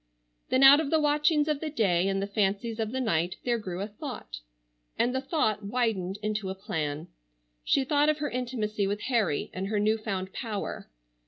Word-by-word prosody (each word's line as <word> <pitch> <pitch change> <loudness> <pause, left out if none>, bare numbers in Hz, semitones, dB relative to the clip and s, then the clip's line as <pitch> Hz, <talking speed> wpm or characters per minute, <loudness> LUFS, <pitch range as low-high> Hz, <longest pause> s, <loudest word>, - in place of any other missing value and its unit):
Then 260 +1 +3
out 275 +2 +10
of 315 -3 -1
the 320 - +3
watchings 300 +1 +2
of 300 -2 0
the 315 - -3
day 195 - +2
and 195 0 0
the 195 - -1
fancies 205 +3 -1
of 220 -1 -1
the 260 - -2
night, 175 -7 0
there 240 -1 +1
grew 185 -3 -5
a 200 - -2
thought—and - - -6
the 260 - -1
thought 265 - 0
widened 200 -4 -1
into 215 -2 -2
a 190 - -4
plan. 155 -6 -3 0.6
She 275 - +2
thought 290 +2 +3
of 305 - +2
her 295 -1 -3
intimacy 225 -5 -2
with 205 +1 -2
Harry 220 - 0
and 190 +1 -3
her 210 0 0
new 215 +2 +2
found 190 -3 -4
power. 215 - -5
215 Hz, 190 wpm, -28 LUFS, 190-260 Hz, 0.6 s, out